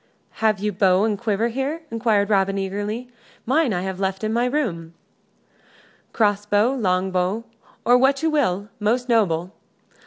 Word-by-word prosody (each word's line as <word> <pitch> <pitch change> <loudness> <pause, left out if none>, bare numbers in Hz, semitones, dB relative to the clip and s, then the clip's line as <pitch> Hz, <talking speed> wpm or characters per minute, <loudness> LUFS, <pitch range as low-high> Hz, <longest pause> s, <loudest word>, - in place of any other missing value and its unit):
"Have 215 -1 +3
you 210 +2 -2
bow 190 0 +3
and 215 -1 +1
quiver 220 +1 -1
here?" 275 +7 -3
inquired 220 -3 +1
Robin, 195 -1 +2
eagerly. 205 +5 -3 0.4
"Mine 270 +1 +2
I 180 -3 -1
have 190 -1 -4
left 190 +1 -2
in 215 0 -1
my 240 +1 +1
room." 175 - -2 1.2
"Cross 205 -2 +1
bow, 210 +5 +3
longbow, 185 -2 0 0.4
or 245 +1 +5
what 270 +3 +2
you 320 - +2
will, 205 -9 0
most 235 +4 0
noble. 185 -6 +1
210 Hz, 150 wpm, -22 LUFS, 190-240 Hz, 1.2 s, or